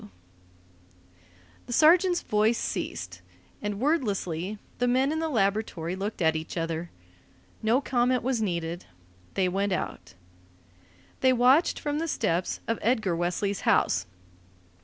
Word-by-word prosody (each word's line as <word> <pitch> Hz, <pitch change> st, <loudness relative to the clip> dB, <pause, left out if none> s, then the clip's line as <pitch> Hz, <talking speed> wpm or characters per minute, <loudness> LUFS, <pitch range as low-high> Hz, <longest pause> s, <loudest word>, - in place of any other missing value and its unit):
W. 105 Hz, -, -13 dB, 1.6 s
The 245 Hz, -, -4 dB
sergeant's 350 Hz, +6 st, +5 dB
voice 215 Hz, +2 st, +2 dB
ceased, 90 Hz, +1 st, -4 dB, 0.4 s
and 205 Hz, -1 st, -3 dB
wordlessly 210 Hz, -, -1 dB, 0.2 s
the 245 Hz, -, +2 dB
men 260 Hz, +3 st, +2 dB
in 315 Hz, -, -1 dB
the 325 Hz, 0 st, -1 dB
laboratory 195 Hz, -, 0 dB
looked 195 Hz, -1 st, -3 dB
at 160 Hz, 0 st, +3 dB
each 160 Hz, +2 st, -5 dB
other. 165 Hz, +1 st, -3 dB, 0.7 s
No 230 Hz, +4 st, +2 dB
comment 250 Hz, -2 st, +1 dB
was 250 Hz, -2 st, 0 dB
needed. 170 Hz, -3 st, -3 dB, 0.5 s
They 190 Hz, -2 st, +2 dB
went 195 Hz, +2 st, 0 dB
out. 95 Hz, -, -5 dB, 1.0 s
They 260 Hz, -1 st, +4 dB
watched 255 Hz, +7 st, +4 dB
from 295 Hz, 0 st, -2 dB
the 330 Hz, -, -2 dB
steps 175 Hz, -, -1 dB
of 230 Hz, -, -1 dB
Edgar 215 Hz, -6 st, +1 dB
Wesley's 180 Hz, +4 st, -1 dB
house. 95 Hz, -, +2 dB
210 Hz, 130 wpm, -27 LUFS, 175-255 Hz, 1.6 s, sergeant's